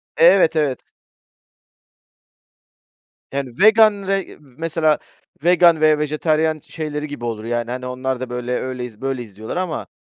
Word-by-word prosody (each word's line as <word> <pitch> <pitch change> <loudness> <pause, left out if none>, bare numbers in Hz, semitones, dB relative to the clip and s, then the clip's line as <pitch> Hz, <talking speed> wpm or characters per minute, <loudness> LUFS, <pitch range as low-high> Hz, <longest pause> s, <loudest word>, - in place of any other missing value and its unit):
Evet, 175 0 +5
evet. 145 -4 0 2.5
Yani, 135 -2 -3
vegan, 215 -2 +5
re 195 0 -2
mesela 155 +2 -1 0.4
vegan 170 -2 +5
ve 155 -1 +4
vejetaryen 155 +1 0
şeyleri 150 -1 -5
gibi 145 -5 -7
olur, 110 -2 -4
yani, 120 0 -2
hani, 125 0 -5
onlar 130 0 -3
da 130 -1 -5
böyle, 125 0 -4
öyleyiz, 125 -4 -6
böyleyiz 125 -7 -4
diyorlar 110 +9 -6
ama, 180 -3 -3
150 Hz, 125 wpm, -20 LUFS, 125-165 Hz, 2.5 s, Evet